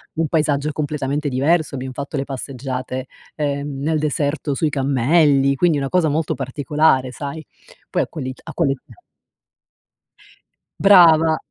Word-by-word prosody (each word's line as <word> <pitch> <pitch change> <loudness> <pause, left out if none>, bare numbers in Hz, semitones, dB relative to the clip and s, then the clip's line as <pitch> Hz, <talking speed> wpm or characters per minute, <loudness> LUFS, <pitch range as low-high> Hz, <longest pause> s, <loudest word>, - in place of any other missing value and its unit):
un 160 -1 0
paesaggio 150 -2 0
completamente 145 0 -2
diverso. 150 +5 +1
Abbiamo 130 0 -5
fatto 140 +3 -6
le 135 - -1
passeggiate, 130 -1 -5 0.3
ehm, 140 -1 -3
nel 155 +2 0
deserto 145 0 -1
sui 155 +1 0
cammelli, 140 +1 +2
quindi 160 +1 +2
una 135 -1 -3
cosa 175 -4 +2
molto 155 +1 -1
particolare 135 0 +1
sai. 145 +3 -6 0.5
Poi - - 0
a - - -6
quell'it 130 -4 -7
a - - -8
quell'età 135 -5 0 2.0
Brava. 165 -5 +6
145 Hz, 130 wpm, -20 LUFS, 135-155 Hz, 2.0 s, Brava